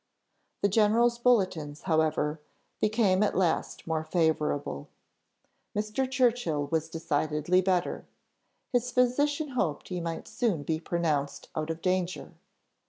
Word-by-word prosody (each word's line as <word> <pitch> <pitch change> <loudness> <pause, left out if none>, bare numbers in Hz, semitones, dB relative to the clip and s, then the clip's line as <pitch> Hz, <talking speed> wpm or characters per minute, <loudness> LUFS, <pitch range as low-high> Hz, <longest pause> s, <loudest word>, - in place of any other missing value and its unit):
The - - +6
general's 225 +4 +3
bulletins, 185 -12 +1
however, 155 -2 +1 0.4
became 210 -3 +2
at 210 - +1
last 175 -4 0
more 160 -1 -1
favourable: 155 - 0 0.9
Mr. 215 +5 -1
Churchill 245 - +1
was 160 -1 0
decidedly 155 +2 +1
better; 185 -1 0 0.7
his 245 0 +1
physician 285 +5 +1
hoped 190 - -2
he 180 -2 -3
might 165 -1 -4
soon 220 - -1
be 160 +1 -1
pronounced 155 -4 -2
out 155 0 -2
of 165 0 -4
danger. 185 -1 -1
180 Hz, 115 wpm, -28 LUFS, 160-230 Hz, 0.9 s, The